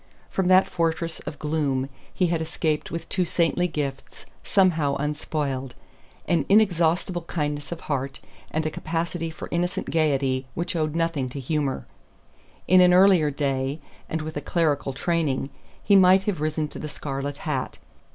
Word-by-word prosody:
From 190 -2 0
that 185 +1 +6
fortress 165 -2 -1
of 145 - -5
gloom 145 -4 0 0.2
he 185 - +1
had 165 -2 0
escaped 155 -1 -1
with 165 0 -5
two 185 - 0
saintly 175 +1 +1
gifts 140 -5 -5 0.2
somehow 165 -8 +3
unspoiled: 145 -3 -3 0.5
an 170 -4 +2
inexhaustible 175 -3 +3
kindness 150 -3 -3
of 170 - -5
heart 140 -2 -3 0.3
and 155 0 -1
a 155 - 0
capacity 165 +1 -3
for 160 - -8
innocent 175 +2 -1
gaiety 135 -5 +1
which 175 +2 -3
owed 155 -1 -1
nothing 165 -6 0
to 140 - -6
humor. 140 0 -1 0.8
In 185 +1 +7
an 180 0 +6
earlier 185 -5 +6
day 140 0 -1 0.3
and 160 -1 -2
with 155 0 -6
a 145 - -2
clerical 145 -3 0
training 145 -3 -1 0.3
he 200 - +4
might 190 0 +6
have 195 -6 -2
risen 155 0 0
to - - -9
the 150 - -5
scarlet 140 0 -4
hat. 140 -5 -2
155 Hz, 155 wpm, -25 LUFS, 145-170 Hz, 0.8 s, In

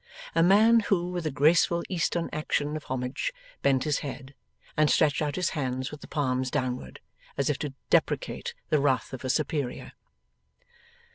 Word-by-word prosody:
A 165 - +3
man 215 +6 +6
who 180 -4 0
with 175 -3 -2
a - - +1
graceful 165 +4 +3
Eastern 170 -1 0
action 150 -1 -1
of 155 - -6
homage 130 - -2 0.3
bent 130 -2 +3
his 150 -3 0
head, 135 -1 -7 0.4
and 155 -1 +3
stretched 150 -1 +3
out 150 -1 -1
his 180 -2 0
hands 130 -2 -2
with 150 -1 -9
the - - -10
palms 130 -3 0
downward, 125 - -3 0.4
as 140 +1 +2
if 145 - -4
to 145 -3 -4 0.2
deprecate - - 0 0.2
the 150 - +4
wrath 135 -3 +1
of 130 - -6
a 130 - -3
superior. 145 -2 -1
145 Hz, 165 wpm, -27 LUFS, 130-165 Hz, 0.4 s, man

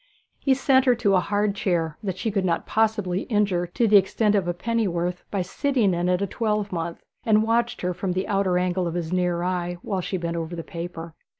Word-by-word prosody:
He 270 -2 +2
sent 265 0 +3
her 250 -2 +5
to 220 -4 +1
a 185 - +5
hard 205 +2 0
chair 170 -6 -1
that 190 -3 -3
she 225 - -2
could 195 -2 0
not 170 -2 0
possibly 210 -4 +1
injure 200 -5 +1
to 225 +7 +1
the 210 -1 +7
extent 205 +2 +2
of 195 -4 +1
a 175 - 0
pennyworth 180 -5 -1
by 195 -3 -1
sitting 230 +1 +1
in 175 +1 0
it 180 +2 +1
a - - +2
twelvemonth, 200 -6 -2 0.2
and 215 -1 +4
watched 235 +1 0
her 180 0 -1
from 180 +1 -2
the 185 +2 -2
outer 195 -3 +1
angle 180 0 0
of 170 - -4
his 170 -1 -3
near 180 -1 0
eye 175 -1 -2
while 195 -3 -2
she 185 - -3
bent 170 -1 -3
over 165 +1 -4
the 165 - -5
paper. 170 -1 -7
185 Hz, 220 wpm, -24 LUFS, 175-210 Hz, 0.2 s, the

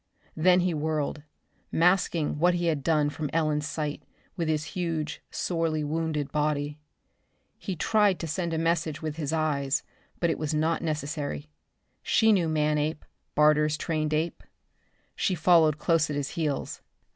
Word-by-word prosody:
Then 180 +3 +4
he 180 -1 +1
whirled, 150 -1 -2 0.5
masking 170 -3 +2
what 175 +2 +4
he 175 0 -1
had 155 -4 +1
done 150 -1 +2
from 150 -1 -4
Ellen's 155 -2 +1
sight 150 -2 -3 0.3
with 170 -3 -2
his 155 -1 0
huge, 160 -4 -2
sorely 165 -3 -1
wounded 155 -1 -2
body. 150 0 -1 0.8
He 190 - -4
tried 205 +2 +3
to - - -3
send 170 +2 -2
her - - -1
a - - -1
message 165 -2 0
with 155 -1 -3
his 150 -3 -2
eyes, 150 -3 0 0.4
but 170 -2 +2
it - - -3
was 155 0 -1
not 160 +2 +1
necessary. 145 - -3 0.5
She 220 0 +3
knew 175 -5 +2
Manape, 150 0 0 0.3
Barter's 150 0 +4
trained 155 -1 -1
ape. 155 +2 -1 0.7
She 190 - 0
followed 160 -2 +4
close 160 0 +2
at 145 - -2
his 145 -1 -2
heels. 150 -5 -3
155 Hz, 155 wpm, -27 LUFS, 150-165 Hz, 0.8 s, Then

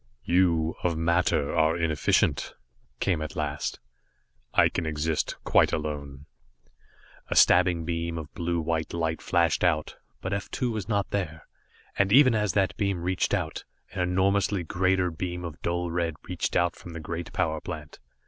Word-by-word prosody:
"You, 85 -2 +2
of 85 -2 +1
matter, 85 -3 +1
are 80 +1 +3
inefficient," 80 -3 +1 0.4
came 90 -5 0
at 75 0 -5
last. 75 -2 -3 0.7
"I - - +5
can 85 - -3
exist 80 +1 -1
quite - - +4
alone." 70 -2 -4 1.0
A - - -2
stabbing 90 -2 +5
beam 85 0 -2
of 80 -2 -7
blue 85 0 -1
white 80 +1 -2
light 80 -1 -1
flashed 85 -1 +1
out, 80 -4 +1 0.2
but 95 - -3
F 100 0 -3
2 125 -2 -1
was 110 -3 -4
not 100 -2 0
there, 80 -6 -3 0.5
and 100 0 +3
even 130 +1 +7
as 105 -3 +1
that 95 -2 +1
beam 100 -5 -1
reached 90 0 +1
out, - - -3 0.3
an - - -6
enormously 95 +1 +1
greater 90 +1 +1
beam 90 +1 -4
of 80 -3 -8
dull 85 0 -1
red 85 -2 -1
reached 90 -2 -2
out 85 0 +2
from 85 - -11
the 85 - -6
great 85 +1 -5
power 80 -1 -1
plant. 75 -4 -8
85 Hz, 160 wpm, -27 LUFS, 80-90 Hz, 1.0 s, even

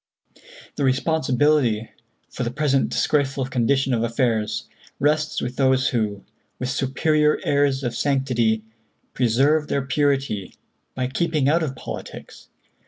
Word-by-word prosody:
"The 145 - -1
responsibility 130 -4 +1 0.4
for - - -8
the 120 - 0
present 135 +1 +1
disgraceful 140 -2 0
condition 130 +1 +1
of 115 - +1
affairs 115 -2 -1 0.3
rests 150 +1 +1
with 125 +1 -4
those 130 -1 +3
who, 105 -4 -2 0.3
with 125 - -3
superior 150 +3 +1
airs 140 -1 +1
of 120 -2 -2
sanctity, 120 -6 +1 0.5
preserve 140 +6 +2
their 140 - -1
purity 135 -8 0 0.4
by 130 - -1
'keeping 150 +1 0
out 165 +4 +3
of 140 -4 -3
politics.' - - -9
135 Hz, 120 wpm, -23 LUFS, 120-145 Hz, 0.5 s, those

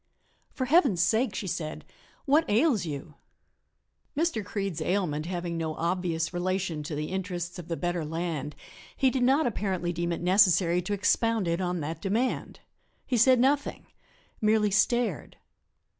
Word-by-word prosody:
"For 260 - -3
Heaven's 265 - +4
sake," 220 +1 +1
she 200 - -3
said, 160 -4 -4 0.4
"what 300 +4 +3
ails 220 - +2
you?" 150 +1 -6 1.0
Mr. 320 -9 0
Creede's 195 -4 -3
ailment 170 -5 -1
having 175 -2 -3
no 160 -1 -3
obvious 170 -1 -1
relation 180 -2 -1
to 150 +1 -5
the 150 +1 -3
interests 180 -2 -4
of 170 - -9
the 165 - -3
better 175 -1 -2
land 155 -2 -3 0.4
he 265 -1 +3
did 260 - -1
not 270 +5 +3
apparently 190 -6 -1
deem 170 0 -2
it 170 - -3
necessary 180 -1 +4
to 205 +4 -3
expound 220 0 +1
it 170 +2 0
on 180 -2 -1
that 160 +3 -5
demand; 220 +6 -1 0.4
he 250 - -1
said 250 +2 +5
nothing 280 +3 +1 0.6
merely 215 -1 +3
stared. 220 - +1
185 Hz, 150 wpm, -28 LUFS, 170-225 Hz, 1.0 s, said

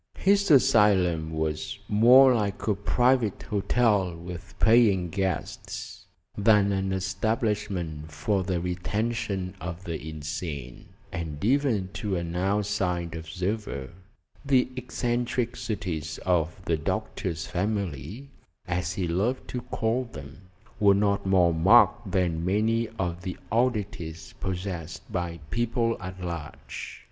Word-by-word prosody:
His 200 +1 +3
asylum 105 - +4
was 80 -1 -2
more 125 +5 +7
like 105 -4 -1
a 105 - +4
private 120 +2 +1
hotel 100 -3 +1
with 85 +1 -9
paying 105 -7 +4
guests 95 0 -4 0.3
than 105 -1 +4
an 95 0 0
establishment 95 -5 -2
for 95 +6 0
the 90 -2 -1
retention 95 +2 -2
of 90 0 -6
the 80 -3 -5
insane, 75 -4 -6 0.2
and 80 0 -4
even 120 -7 +2
to 105 -3 -2
an 85 -1 -3
outside 95 -3 0
observer 90 -3 -4 0.5
the 130 -3 +3
eccentricities 120 - -2
of 90 0 +1
the 80 - +1
doctor's 80 +1 -3
family 100 - -3 0.4
as 85 0 -1
he 95 -3 -2
loved 100 +10 -1
to 125 - -3
call 115 +3 -1
them 80 - -11 0.3
were 100 -2 +6
not 100 -1 +1
more 90 -3 +4
marked 80 0 +5
than 85 -3 +1
many 110 +5 +1
of 90 -1 -2
the 90 0 -5
oddities 105 -9 -1
possessed 90 -4 -4
by 85 -1 -3
people 115 0 +1
at 95 0 -7
large. 85 -4 -6
95 Hz, 115 wpm, -27 LUFS, 85-110 Hz, 0.5 s, more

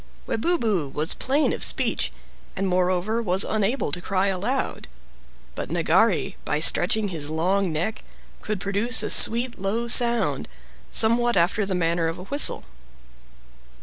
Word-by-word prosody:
Webubu 220 - -2
was 155 +4 0
plain 280 +4 -1
of - - -2
speech, - - 0 0.4
and 195 - -3
moreover 185 +4 -1
was 190 -2 +1
unable 215 - -2
to 175 - -4
cry 195 +2 -2
aloud, 210 +8 -4 0.7
but - - -7
Nagari, - - 0
by - - -3
stretching 215 -2 +2
his 155 -5 -4
long 180 +4 -1
neck, 175 +8 -4 0.4
could 215 -2 -5
produce 200 +6 +3
a - - +1
sweet 235 +2 +6
low 215 +5 -3
sound, 235 0 +1 0.4
somewhat 235 0 +3
after 185 +4 0
the 190 - -3
manner 170 -1 -1
of 165 +2 -5
a 180 - -10
whistle. 285 +9 +1
200 Hz, 140 wpm, -22 LUFS, 180-235 Hz, 0.7 s, sweet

